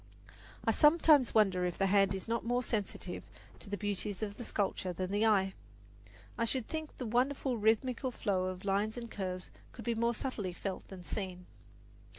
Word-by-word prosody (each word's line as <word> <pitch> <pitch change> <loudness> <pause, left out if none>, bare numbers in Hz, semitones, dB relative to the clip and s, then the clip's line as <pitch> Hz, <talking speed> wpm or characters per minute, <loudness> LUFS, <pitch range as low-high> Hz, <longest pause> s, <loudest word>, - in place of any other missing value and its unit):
I - - +4
sometimes 300 -5 +5
wonder 195 -4 +4
if 180 -1 -1
the 195 - +2
hand 195 0 +4
is 190 - -6
not 230 0 0
more 245 +2 +1
sensitive 205 -5 -3 0.4
to - - -11
the 205 - -2
beauties 205 0 -2
of 205 -1 -2
sculpture 190 -2 -1
than 185 +1 -3
the 210 +2 +3
eye. 195 -3 +3 0.9
I - - +3
should 245 0 -1
think 315 -1 -5
the 255 - -4
wonderful 255 +3 +1
rhythmical 230 +4 +2
flow 200 -6 0
of 185 +1 -5
lines 205 +3 +1
and 235 -1 -6
curves 185 -2 -4 0.2
could 235 - -9
be 235 - +1
more 235 +1 +1
subtly 210 -8 -3
felt 190 +1 -5
than 185 -2 -9
seen. 180 -1 -4
210 Hz, 175 wpm, -33 LUFS, 190-235 Hz, 0.9 s, sometimes